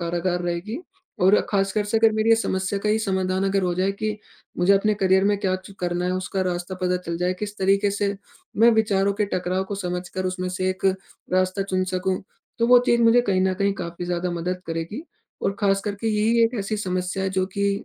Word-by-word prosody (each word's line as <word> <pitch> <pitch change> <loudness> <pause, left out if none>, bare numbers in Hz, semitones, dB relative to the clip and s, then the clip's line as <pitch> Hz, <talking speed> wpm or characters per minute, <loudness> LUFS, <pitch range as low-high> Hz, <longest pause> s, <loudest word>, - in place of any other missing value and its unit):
कारगर 175 +1 -1
रहेगी 175 - -3 0.4
और 190 +3 +6 0.2
ख़ासकर 200 +1 +1
से 220 +2 +1
अगर 225 -1 +5
मेरी 220 +1 +2
ये - - +8
समस्या 190 -2 -1
का 210 - -2
ये 215 +1 +3
समाधान 190 -2 0
अगर 195 0 +1
हो 180 -1 +1
जाए 190 +2 +1
कि 215 +1 -3 0.4
मुझे 180 +3 +4
अपने 210 +2 +3
करियर 190 +1 +4
में 205 0 +3
क्या 185 -2 0
च 185 +1 -13
करना 175 0 -1
है 180 - 0
उसका 185 +1 -2
रास्ता 180 0 -3
पता 180 0 +2
चल 170 0 -2
जाए, 180 +1 +1
किस 205 +2 -6
तरीक़े 195 +1 +2
से 200 0 -1 0.4
मैं 230 +2 +6
विचारों 200 -3 +2
के 210 0 +1
टकराव 185 +1 -1
को 200 - -5
समझकर 180 0 -4
उसमें 185 0 -2
से 185 +1 -1
एक 185 +1 -7 0.5
रास्ता 185 +1 +1
चुन 185 -1 -1
सकूँ, 185 0 -1 0.4
तो 230 - +2
वो 245 0 +8
चीज़ 235 0 +3
मुझे 230 +1 +6
कहीं 185 -2 +2
न 190 0 +1
कहीं 200 +1 +1
काफ़ी 170 -1 -6
ज़्यादा 175 0 -2
मदद 180 +2 -3
करेगी 165 - -4 0.4
और 195 - 0
ख़ासकर 200 0 +1
के 225 - 0
यही 220 +2 +2
एक 230 +2 -1
ऐसी 205 +2 -2
समस्या 185 -1 -2
है 190 - -1
जो 185 0 0
कि 200 0 0
190 Hz, 220 wpm, -23 LUFS, 185-205 Hz, 0.5 s, ये